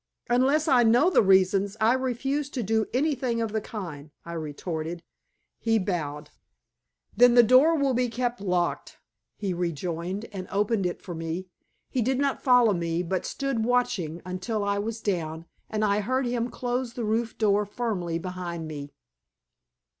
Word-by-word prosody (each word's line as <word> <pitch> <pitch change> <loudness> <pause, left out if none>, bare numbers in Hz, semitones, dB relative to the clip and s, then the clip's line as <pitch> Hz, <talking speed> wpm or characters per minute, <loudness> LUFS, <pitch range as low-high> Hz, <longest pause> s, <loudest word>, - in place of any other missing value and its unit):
"Unless 275 +6 +3
I 255 -5 +5
know 240 +10 +4
the - - +5
reasons, 195 +1 +3
I 225 +2 +4
refuse 265 +3 -1
to 245 - 0
do 220 +1 +1
anything 255 -3 0
of 225 -2 -1
the 220 0 -1
kind," 165 -10 -7 0.2
I 170 - -6
retorted. 160 +1 -5 0.6
He 225 -1 +2
bowed. 155 -7 -3 0.8
"Then 245 0 +6
the 240 - +9
door 260 +8 +6
will 280 -2 +2
be 250 0 +1
kept 240 -2 -2
locked," 180 -3 -1 0.4
he 195 -3 -2
rejoined, 175 +3 -3
and 185 -2 -6
opened 205 -1 +1
it 175 - -6
for 180 - -6
me. 165 +3 -4 0.4
He 255 - -1
did 255 +3 +1
not 280 0 0
follow 245 -4 +5
me, 170 -1 -1
but 180 +1 -2
stood 275 -5 -2
watching 205 -9 0
until 185 +4 -3
I 200 0 0
was 220 +2 -4
down, 165 -5 -2 0.2
and 215 0 0
I 200 0 +2
heard 255 +5 0
him 240 0 -1
close 245 0 -3
the 240 -2 -3
roof 225 +2 -1
door 210 -1 +3
firmly 205 -6 -2
behind 175 -2 -5
me. 145 -2 -6
210 Hz, 160 wpm, -26 LUFS, 175-245 Hz, 0.8 s, the